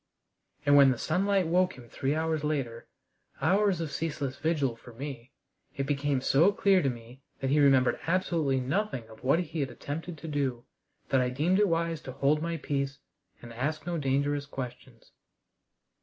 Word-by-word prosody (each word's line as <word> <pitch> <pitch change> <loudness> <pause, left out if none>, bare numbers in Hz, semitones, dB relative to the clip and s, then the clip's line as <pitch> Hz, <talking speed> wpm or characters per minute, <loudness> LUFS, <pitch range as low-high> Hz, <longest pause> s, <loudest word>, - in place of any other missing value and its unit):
And 145 0 +5
when 140 -1 +8
the 130 - +1
sunlight 190 +5 +1
woke 180 +1 +2
him 120 -2 -12
three 135 +5 -1
hours 160 -1 -1
later 135 -6 -2 0.5
hours 195 -2 +2
of 160 -3 -3
ceaseless 145 -4 -3
vigil 145 -7 0
for 115 +1 -14
me 130 -1 -7 0.4
it 135 - -2
became 140 -1 0
so 160 +9 +4
clear 200 -3 +3
to 135 - +1
me 120 +2 -9 0.2
that 135 0 -1
he 150 - +4
remembered 135 -3 +4
absolutely 165 -6 +1
nothing 135 - -2
of 110 - -15
what 135 +5 +4
he 170 -2 -3
had 140 -2 -1
attempted 155 +7 -6
to 165 - -8
do, 135 -5 -2 0.4
that 135 - +3
I 125 - +1
deemed 160 +9 +1
it 210 - +4
wise 165 -2 0
to 130 - -8
hold 140 +3 +2
my 170 0 -2
peace 140 -2 -2 0.5
and 120 -1 -9
ask 145 +5 -3
no 175 -2 -2
dangerous 140 +1 0
questions. 125 -3 -8
145 Hz, 175 wpm, -29 LUFS, 130-165 Hz, 0.5 s, when